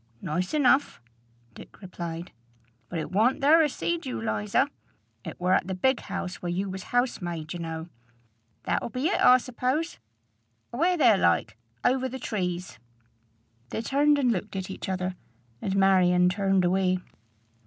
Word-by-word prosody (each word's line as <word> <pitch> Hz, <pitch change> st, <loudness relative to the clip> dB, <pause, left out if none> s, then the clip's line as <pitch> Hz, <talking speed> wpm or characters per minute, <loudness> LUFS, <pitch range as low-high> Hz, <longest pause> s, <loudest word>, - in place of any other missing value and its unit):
"Nice 180 Hz, -, -2 dB
enough," 275 Hz, -, +3 dB, 0.5 s
Dick -, -, -14 dB
replied. 170 Hz, -3 st, -7 dB, 0.6 s
"But 175 Hz, -, -4 dB
it 160 Hz, -, -4 dB
warn't 225 Hz, +9 st, +2 dB
there 305 Hz, +4 st, +6 dB
I 310 Hz, -, +4 dB
seed 340 Hz, +4 st, -2 dB
you, 255 Hz, -, -3 dB
Liza. 220 Hz, +3 st, 0 dB, 0.6 s
It -, -, -8 dB
wur 180 Hz, +1 st, +2 dB
at 185 Hz, -, +2 dB
the 190 Hz, -, -3 dB
big 260 Hz, +7 st, +2 dB
house 180 Hz, 0 st, -5 dB
where 175 Hz, -, -3 dB
you 190 Hz, +2 st, -2 dB
was 190 Hz, 0 st, -7 dB
housemaid, 175 Hz, -10 st, -2 dB
you 175 Hz, -, -6 dB
know. 165 Hz, 0 st, -5 dB, 0.8 s
That'll -, -, -1 dB
be 255 Hz, +7 st, -1 dB
it, -, -, 0 dB
I 250 Hz, -, +8 dB
suppose, 255 Hz, -, -2 dB, 0.7 s
away 345 Hz, +9 st, +2 dB
there 330 Hz, -, +5 dB
like, -, -, +2 dB, 0.3 s
over 260 Hz, 0 st, +2 dB
the 260 Hz, -, -6 dB
trees." 180 Hz, -, -4 dB, 0.9 s
They 225 Hz, -, -4 dB
turned 290 Hz, +4 st, +3 dB
and 255 Hz, -4 st, +2 dB
looked 205 Hz, -1 st, -3 dB
at 190 Hz, 0 st, -4 dB
each 190 Hz, -, -6 dB
other, 185 Hz, 0 st, -2 dB, 0.5 s
and 195 Hz, -, -2 dB
Marion 180 Hz, -2 st, +4 dB
turned 195 Hz, -1 st, +1 dB
away. 185 Hz, 0 st, +2 dB
195 Hz, 155 wpm, -27 LUFS, 180-260 Hz, 0.9 s, I